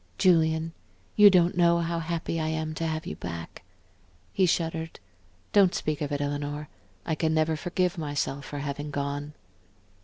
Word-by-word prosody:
"Julian, 160 -2 +3 0.4
you 210 -1 +9
don't 180 -2 +4
know 170 -1 +4
how 170 0 -1
happy 165 0 -2
I 155 - -1
am 160 0 -2
to 165 +1 -2
have 155 0 -3
you - - -5
back." 85 0 -7 0.7
He 190 -2 +3
shuddered, 165 -1 -1 0.5
"Don't 195 -3 +5
speak 155 -1 -2
of 145 -1 -2
it, 145 0 -1
Eleanor. 145 +1 -3 0.4
I - - -1
can 160 0 0
never 155 0 +2
forgive 180 +2 -1
myself 145 -2 -2
for 145 - -6
having 145 +1 -4
gone." 145 +1 -3
160 Hz, 160 wpm, -27 LUFS, 145-170 Hz, 0.7 s, you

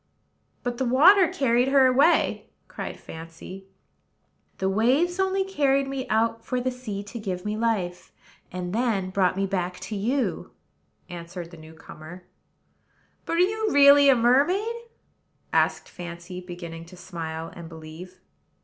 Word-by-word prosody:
"But 245 -1 -3
the 260 - 0
water 340 +10 +6
carried 250 -4 +1
her 270 -1 +5
away," 275 +7 +3 0.2
cried - - -7
Fancy. 165 +4 -10 0.9
"The 190 - -1
waves 260 - +2
only 385 0 +1
carried 275 -7 +1
me 270 -1 -4
out 225 +1 +1
for 255 - -2
the 255 +1 -1
sea 220 -6 -6
to 205 +4 -8
give 185 -3 -5
me 210 0 -2
life, 205 -6 -2 0.4
and 180 0 -5
then 215 -5 0
brought 185 -1 +1
me 195 - +1
back 180 -2 -3
to 215 - -5
you," 245 +7 -2 0.5
answered 175 -1 -8
the 170 - -12
new 160 +1 -13
comer. 160 +3 -12 1.0
"But - - -2
are 335 - +1
you 430 +3 +1
really 280 0 +7
a 270 - +6
mermaid?" 295 - +2 0.8
asked - - +1
Fancy, 175 +1 -8
beginning 170 -2 -8
to 180 +2 -14
smile 165 -3 -6
and 170 -1 -9
believe. 165 +3 -11
210 Hz, 145 wpm, -25 LUFS, 180-270 Hz, 1.0 s, really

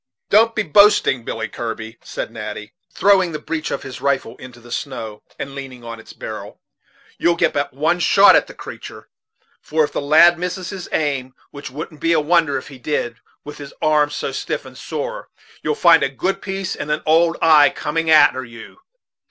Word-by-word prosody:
"Don't 225 +2 +4
be 220 - +1
boasting, 185 - +4
Billy 115 0 -4
Kirby," 115 0 -6
said - - -6
Natty, 105 0 -7 0.2
throwing 190 -4 +3
the - - -2
breech 155 +1 -4
of - - -4
his 130 -1 -9
rifle 140 -4 -1
into 125 -1 -12
the 120 0 -15
snow, 115 -5 -5 0.2
and 140 - -6
leaning 135 -3 -9
on 115 -1 -8
its 110 - -13
barrel; - - -8 0.6
"you'll 170 0 +3
get - - +1
but 145 0 -1
one 160 +6 0
shot 195 +3 +6
at - - +3
the - - -12
creatur', - - -10 0.5
for 155 +1 0
if 145 - -2
the - - -3
lad 160 +4 +5
misses 180 +1 -4
his 190 -3 -7
aim, 135 -4 -2 0.2
which 145 0 -8
wouldn't 150 +3 -8
be 165 0 +2
a 160 - +3
wonder 160 -1 +2
if 130 - -8
he 135 -3 -12
did, 120 -3 -2 0.3
with 150 0 -10
his 140 -1 -10
arm 150 -1 +2
so 150 - -4
stiff - - -4
and - - -12
sore, - - -5 0.3
you'll - - -1
find - - +5
a - - +1
good 190 +1 -2
piece 195 -1 -4
and 150 - -6
an 150 0 -1
old 165 +2 +3
eye 155 -3 +6
coming 160 +2 -3
a'ter 150 -4 +5
you. 115 - -13
150 Hz, 195 wpm, -19 LUFS, 130-170 Hz, 0.6 s, shot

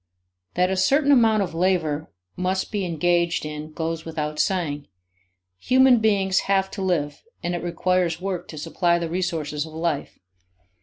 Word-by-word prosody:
That 180 +1 +2
a - - +1
certain 280 +10 +3
amount 225 -6 +5
of 175 - -5
labor 165 -4 0 0.3
must 185 +1 -1
be 205 -3 -1
engaged 170 0 +1
in 150 0 -6
goes 160 0 -3
without 150 -2 -4
saying. 150 -7 -1 0.7
Human 260 - +5
beings 195 -3 +2
have 195 -1 +2
to 200 - -6
live 170 -6 -1 0.2
and 175 - -1
it 175 - -3
requires 175 -1 0
work 185 -1 -4
to 155 - -9
supply 170 +3 +1
the 170 -1 -3
resources 160 -5 -2
of 160 0 -10
life. 160 -2 -2
175 Hz, 155 wpm, -23 LUFS, 160-190 Hz, 0.7 s, amount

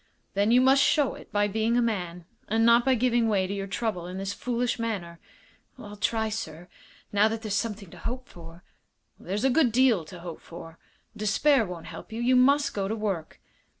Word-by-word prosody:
"Then 200 +2 +2
you 245 +2 +5
must 265 +1 +5
show 285 -2 +3
it - - -13
by 205 0 +2
being 220 +3 0
a - - +4
man, 180 -6 -3 0.2
and 225 +2 +2
not 235 +1 +6
by 265 0 +3
giving 240 -1 +2
way 195 -3 +2
to 190 - -4
your 195 -1 -4
trouble 190 -4 -3
in 180 +1 -6
this 195 +1 -3
foolish 245 +1 -2
manner." 185 -7 -4 0.6
"I'll 210 -4 -10
try, 220 +2 0
sir, 175 -6 -6 0.5
now 205 +1 +5
that 225 +1 -4
there's 215 -2 -3
something 205 -4 -3
to - - -12
hope 255 +1 -5
for." 170 0 -13 0.6
"There's 200 +4 -3
a 265 - +4
good 270 -3 +3
deal 240 -6 +3
to 175 +2 -11
hope 170 -2 -8
for. 165 -1 -11 0.4
Despair 225 +4 +2
won't 175 -2 -8
help - - -10
you. 225 - -5
You 250 +2 +3
must 280 +3 +4
go 195 -1 -2
to 220 - -2
work." 195 -7 -4
215 Hz, 205 wpm, -27 LUFS, 190-240 Hz, 0.6 s, not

